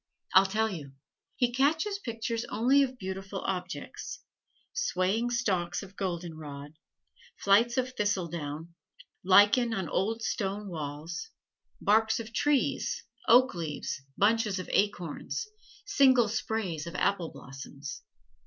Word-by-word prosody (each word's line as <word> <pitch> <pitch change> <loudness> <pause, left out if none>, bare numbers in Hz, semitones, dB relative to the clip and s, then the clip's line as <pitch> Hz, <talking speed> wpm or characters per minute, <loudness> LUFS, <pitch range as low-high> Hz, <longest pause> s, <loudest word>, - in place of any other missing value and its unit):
I'll 190 +1 +7
tell 220 +3 +1
you. 145 -7 -7 0.4
He 245 -2 +1
catches 320 - +2
pictures 230 - -3
only 260 +5 +3
of 260 -2 0
beautiful 190 -1 -5
objects: 185 -2 -5 0.5
swaying 230 - +1
stalks 190 -7 0
of 195 0 -12
goldenrod, 160 -6 -5 0.7
flights 230 +5 +4
of 255 0 +1
thistle 200 -6 0
down, 160 0 -6 0.5
lichen 205 +5 +5
on 190 -4 -2
old 225 +7 -1
stone 200 -1 -2
walls, 160 - -5 0.5
barks 220 +2 +3
of 230 0 -7
trees, 290 +2 +1 0.2
oak 255 +3 +6
leaves, 155 -5 -4 0.2
bunches 215 -1 +3
of 185 - -5
acorns, 205 - -1 0.4
single 265 - +5
sprays 200 -7 -2
of 170 - -7
apple 180 -3 +1
blossoms. 135 +1 -9
200 Hz, 115 wpm, -29 LUFS, 175-235 Hz, 0.7 s, I'll